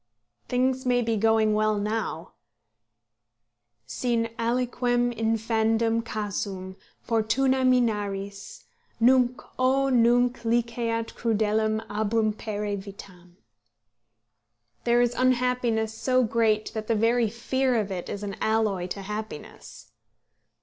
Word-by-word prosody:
Things 255 +1 +1
may 245 -2 +2
be 230 0 0
going 220 0 +3
well 215 0 +1
now 205 -5 -3 1.5
"Sin 230 - -1
aliquem 245 +1 0
infandum 225 0 +1
casum, 200 -4 -4 0.3
Fortuna, 250 +4 +1
minaris; 205 -6 -1 0.4
Nunc, 250 +1 +4 0.2
o 270 +1 +2
nunc 245 0 +3
liceat 230 0 -1
crudelem 220 -1 0
abrumpere 215 -1 -1
vitam." 180 -3 -13 1.5
There 240 0 +4
is 245 0 +2
unhappiness 245 -3 +1
so 255 +2 +1
great 220 -2 +1
that 215 -1 -5
the 230 - +1
very 230 +1 +2
fear 255 +3 0
of 210 -3 -1
it 180 -2 -5
is 205 - -5
an 200 -1 -4
alloy 215 -5 +1
to 195 +2 -6
happiness. 210 -5 -8
225 Hz, 100 wpm, -26 LUFS, 210-245 Hz, 1.5 s, Nunc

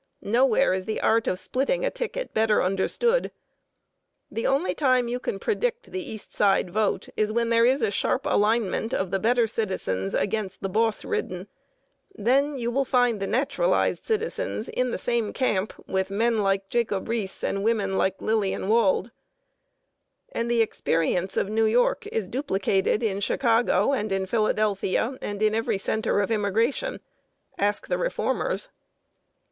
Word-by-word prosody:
Nowhere 245 +1 +3
is 185 +1 -3
the 220 - -2
art 225 +1 +2
of 180 - 0
splitting 275 - -1
a - - 0
ticket - - -4
better 220 -1 +3
understood. 330 - +1 1.0
The 225 - -1
only 280 +7 +1
time 255 -4 +2
you 245 +1 -2
can 205 - -3
predict 475 - -2
the 375 - -3
East 220 - -9
Side 195 -3 +2
vote 210 +1 0
is 215 0 0
when 235 +1 0
there 230 0 +5
is 265 +3 +2
a - - +2
sharp 255 - 0
alignment 220 +1 +1
of 190 -2 -2
the 195 - 0
better 235 +3 +3
citizens 190 - -2
against 200 -2 -2
the 195 - -1
boss 220 +2 +1
ridden. 430 0 -3 0.7
Then 275 +6 +1
you 240 -1 -2
will 275 +3 +1
find 245 -4 +2
the 195 - -2
naturalized 275 - +1
citizens 455 - -2
in 250 0 -1
the - - -2
same 235 -3 -1
camp 215 -6 0 0.2
with 190 0 -1
men 225 +3 +1
like 195 -1 +1
Jacob 220 -5 -1
Riis 225 -4 -3
and 195 0 -1
women 205 -4 +1
like 190 0 0
Lillian 210 -3 -1
Wald. 235 +5 +2 1.2
And 235 0 -2
the 235 -1 +4
experience 175 -2 -1
of - - +1
New 220 +2 +1
York 235 +3 +2
is 215 -4 -2
duplicated 200 -4 0
in 200 -3 0
Chicago 235 +4 +2
and 215 -5 -1
in 195 0 0
Philadelphia 215 +3 0
and 205 +1 -3
in 215 0 +3
every 225 -2 0
center 220 +1 0
of 200 - -2
immigration. 225 - 0 0.6
Ask 205 +1 0
the - - -1
reformers. - - -1
225 Hz, 160 wpm, -25 LUFS, 200-250 Hz, 1.2 s, there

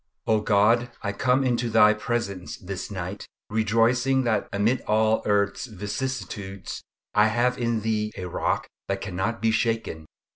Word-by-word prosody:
O 110 -1 +2
God, 110 +4 +3
I 100 - -1
come 125 +5 +2
into 120 -2 0
Thy 105 -1 +6
presence 105 -4 -3
this 95 0 -6
night, 95 0 -5 0.2
rejoicing 115 +5 +2
that 110 -4 0
amid 110 +6 +1
all 110 +1 +3
earth's 100 +3 +1
vicissitudes, 105 -2 -5 0.3
I 105 +1 +5
have 120 +3 +1
in 115 -2 0
Thee 105 -1 -1
a 90 - -4
rock 85 - -1 0.2
that 100 0 -1
cannot 100 +4 -3
be 110 - +4
shaken. 110 -8 -1
110 Hz, 145 wpm, -25 LUFS, 100-120 Hz, 0.3 s, Thy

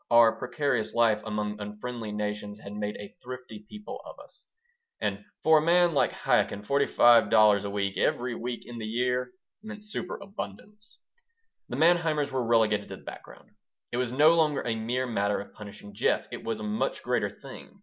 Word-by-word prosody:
Our 115 -1 +7
precarious 135 -7 -1
life 115 -2 +3
among 105 -1 -3
unfriendly 105 +2 -6
nations 105 0 -4
has 100 - -9
made 105 0 -3
a 100 - -10
thrifty 125 -4 -9
people 210 0 -8
of - - -11
us, - - -17 0.5
and 100 0 -2 0.2
for 160 0 +6
a - - -1
man 175 +1 +4
like 145 - +2
Chaikin 100 - +1
forty 140 +4 +2
five 120 -1 +6
dollars 105 -2 +5
a - - -2
week, 100 -1 -2
every 125 0 +1
week 120 +1 -5
in 120 -1 -8
the 110 - -4
year, 125 +2 0 0.3
meant 215 -1 -9
superabundance 210 +1 -7 0.7
The - - -4
Manheimers 160 -3 +3
were 130 -1 0
relegated 110 -3 +2
to - - -6
the - - -16
background. - - -11 0.4
It 120 - -2
was 125 -1 0
no 150 +5 +6
longer 155 -4 +2
a 115 - 0
mere 120 +4 -1
matter 100 -4 0
of 100 - -9
punishing 100 -1 -11
Jeff. - - +1
It - - -7
was 115 -1 -3
a - - -6
much 105 0 -2
greater - - 0
thing. - - -12
120 Hz, 180 wpm, -28 LUFS, 105-140 Hz, 0.7 s, Our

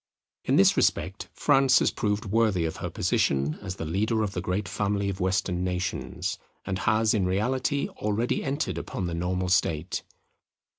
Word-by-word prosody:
In - - +2
this - - +6
respect 95 +6 0
France 135 -2 +4
has - - +3
proved 105 -1 -1
worthy 105 -4 +2
of 80 - -3
her - - -4
position 70 +2 0
as 95 -2 -5
the 80 - -5
leader 110 +7 0
of 105 - -2
the 90 - -3
great 95 +3 -2
family 100 0 -1
of 95 - -4
Western 90 -1 0
nations, 90 -1 -3 0.3
and 95 0 -2
has 110 0 +3
in 100 -4 +1
reality 130 +8 0
already 105 +3 -1
entered 135 - -2
upon 90 - -4
the 85 - -3
normal 90 +2 -1
state. 85 -1 +1
95 Hz, 165 wpm, -27 LUFS, 90-110 Hz, 0.3 s, this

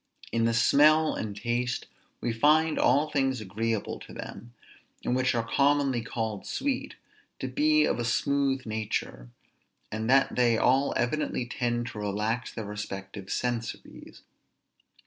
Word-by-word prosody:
In 115 0 +1
the 115 - +2
smell 155 +6 +5
and 105 -2 -4
taste, 120 +2 -1 0.4
we 120 - -1
find 155 +6 +3
all 150 +2 +3
things 135 -3 +1
agreeable 110 +2 -2
to - - -12
them, 115 +5 -8 0.5
and 125 - +1
which 130 -1 +1
are 115 -1 -1
commonly 140 -2 +2
called 110 -3 -4
sweet, 275 -2 -2 0.4
to - - -4
be 310 +1 +3
of - - 0
a - - 0
smooth 135 +2 +1
nature, 110 - -3 0.6
and 110 +2 -3
that 135 +1 +4
they 120 -2 +3
all 135 +4 +2
evidently 125 0 -1
tend 120 -1 -1
to 105 - -8
relax 105 +4 -2
their 110 - -6
respective 100 -1 -6
sensories. 120 +1 -4
120 Hz, 140 wpm, -28 LUFS, 110-140 Hz, 0.6 s, smell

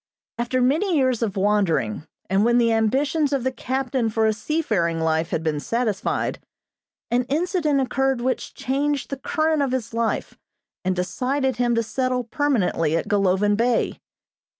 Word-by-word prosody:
After 255 +2 0
many 320 +7 +2
years 255 -4 +2
of 210 -3 -1
wandering, 170 - +1 0.2
and 195 +2 +2
when 240 +1 +3
the 235 -1 +3
ambitions 275 +7 +1
of 275 -3 0
the 260 - 0
captain 255 -2 -1
for 220 0 +1
a 220 - +3
seafaring 210 - -1
life 160 +1 0
had 165 -3 -2
been 155 -2 0
satisfied, 230 +3 -1 0.7
an 245 +1 +2
incident 310 0 +1
occurred 270 0 0
which 255 +2 -2
changed 285 +2 -1
the 275 - -2
current 310 +2 0
of 275 -2 0
his 235 -3 -3
life 230 -1 -2 0.4
and 185 0 0
decided 260 +8 -1
him 240 -1 +2
to 230 - +1
settle 255 +2 -1
permanently 220 - +1
at - - -3
Golovin 205 0 +2
Bay. 235 +2 +1
240 Hz, 155 wpm, -23 LUFS, 205-270 Hz, 0.7 s, when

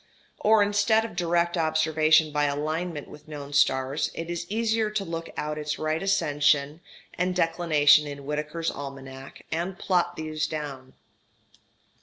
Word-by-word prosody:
Or, 215 -1 +5
instead 205 +2 +2
of 225 - -8
direct 175 0 +1
observation 160 -1 +3
by 150 0 +1
alignment 155 +2 -2
with 150 - -14
known 145 -2 -8
stars, 135 0 +2
it 165 +1 -5
is 170 0 -5
easier 220 0 0
to 210 -2 -2
look 165 0 -5
out 150 0 -3
its 150 0 -3
right 155 +1 -1
ascension 150 -5 +1 0.3
and 180 0 -1
declination 155 -4 +4
in 140 -1 -8
Whitaker's 150 +3 -2
Almanac, 135 -1 -9
and 175 +4 -2
plot 180 -2 0
those 155 -1 -2
down. 140 -4 -6
155 Hz, 140 wpm, -26 LUFS, 145-175 Hz, 0.3 s, Or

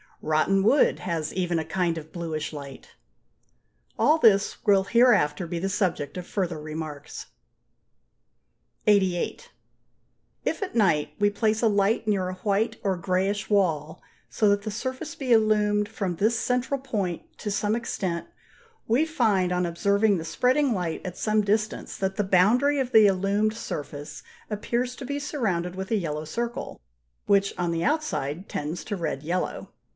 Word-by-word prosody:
Rotten 160 +6 +2
wood 265 +8 +4
has 165 -3 -3
even 180 -2 0
a 160 - -2
kind 175 -1 -1
of 160 0 -8
bluish 160 -3 -4
light. 140 -2 -10 1.0
All 310 - +5
this 200 -6 +3
will 200 -3 +5
hereafter 195 -8 +3
be 170 +1 -3
the 190 +3 -2
subject 185 -8 -1
of 180 -1 -6
further 180 -5 -2
remarks. 155 -2 -7 1.6
88. 190 -4 +1 0.9
If - - -1
at 390 - -4
night 170 -10 +2
we 205 0 +4
place 215 +2 0
a - - +5
light 205 +2 +1
near 190 -3 +1
a - - -4
white 200 +4 0
or 195 -3 0
greyish 190 +3 -1
wall 160 -7 +1 0.3
so 215 - +1
that 205 0 +2
the 215 - -4
surface 260 +8 -5
be 270 -6 -3
illumined 210 -2 +3
from 195 -5 -3
this 220 +6 +1
central 250 +4 0
point 200 -10 -3 0.2
to 210 - -4
some 210 +1 0
extent, 190 -7 -3 0.6
we 245 +8 +3
find, 215 - +1
on 180 0 +1
observing 200 +4 +2
the 160 - -5
spreading 255 - +2
light 175 -5 -2
at 180 -1 -6
some 215 0 +2
distance, 210 +1 -1
that 190 0 -2
the 210 - 0
boundary 225 +10 +3
of 255 -2 -1
the 220 -3 +7
illumined 200 +3 +1
surface 145 -6 -6 0.3
appears 240 +4 -2
to 265 - -7
be 285 +2 -3
surrounded 190 - -2
with 190 0 -5
a - - +3
yellow 155 -6 -2
circle, 235 +9 -4 0.5
which 200 -1 +2
on 175 -1 0
the 165 0 -1
outside 185 - -1
tends 150 +4 -4
to 205 - -4
red 165 -6 -3
yellow. 175 +4 -3
195 Hz, 160 wpm, -26 LUFS, 170-220 Hz, 1.6 s, the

